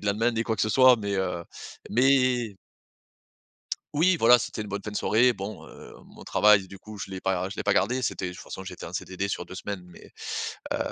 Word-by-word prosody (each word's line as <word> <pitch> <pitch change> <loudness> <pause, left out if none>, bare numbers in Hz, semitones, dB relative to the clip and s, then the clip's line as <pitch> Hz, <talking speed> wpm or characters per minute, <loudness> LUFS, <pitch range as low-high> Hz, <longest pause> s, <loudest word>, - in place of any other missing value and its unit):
de 105 - -7
lendemain 110 +4 +2
ni 115 0 0
quoi 110 -1 -2
que - - 0
ce 110 - +1
soit, 130 +1 +6
mais, 100 -2 -3
heu, 85 -3 -2 0.5
mais 125 -3 +3 1.4
oui 175 +4 +4
voilà, 120 +2 +7
c'était 120 -2 -5
une 105 - -5
bonne 100 0 -4
fin 105 - -5
de 105 - -5
soirée, 120 +3 +3
bon, 100 0 -7
heu, - - -13
mon - - -15
travail 100 -3 +4
du 100 - -11
coup 105 +1 -11
je 100 -1 -6
l'ai 95 -1 -6
pas 95 0 0
je 100 - -9
l'ai - - -3
pas - - +2
gardé, 130 +2 +1
c'était 95 - -2
de 90 - -6
toute 85 - -10
façon 95 - -8
j'étais 90 -1 -8
en 85 - -8
CDD 95 +2 -3
sur 90 - -3
2 - - -10
semaines 95 0 -5
mais, 90 - -16 0.6
heu, - - 0
105 Hz, 235 wpm, -26 LUFS, 95-120 Hz, 1.4 s, voilà